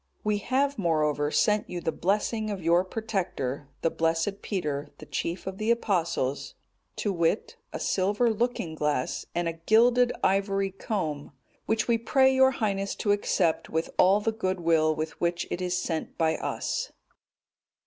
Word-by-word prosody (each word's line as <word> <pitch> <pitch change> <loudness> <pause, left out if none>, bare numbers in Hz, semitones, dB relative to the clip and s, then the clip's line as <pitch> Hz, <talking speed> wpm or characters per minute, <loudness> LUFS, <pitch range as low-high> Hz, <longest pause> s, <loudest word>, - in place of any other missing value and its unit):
"We 210 -1 +1
have, 270 +4 0
moreover, 150 -4 +1
sent 210 +6 +2
you 180 - -4
the 165 - -1
blessing 215 +4 0
of 195 -4 -4
your 170 +2 +4
protector, 185 - -3
the 165 - +2
blessed 165 +5 0
Peter, 150 -8 -3
the - - -11
chief 170 +2 -3
of 190 0 -5
the 215 +1 -1
Apostles, 170 - 0 0.4
to 205 - -1
wit, 170 +3 0
a - - -5
silver 205 +5 +1
looking 225 -7 -1
glass, 150 -4 -1
and 175 0 0
a 165 - -1
gilded 245 +2 +5
ivory 195 0 +1
comb, 160 - -4 0.3
which 220 0 +1
we 235 -1 +2
pray 265 +3 +4
your 265 0 +6
Highness 200 -6 -1
to 205 - 0
accept 185 -4 +1
with 160 +1 -2
all 195 +3 +6
the 225 +2 0
goodwill 170 -7 +1
with 155 +1 -5
which 170 0 0
it 180 - -2
is 180 0 0
sent 165 -3 -3
by 160 -1 +2
us." - - -3
190 Hz, 160 wpm, -27 LUFS, 165-215 Hz, 0.4 s, your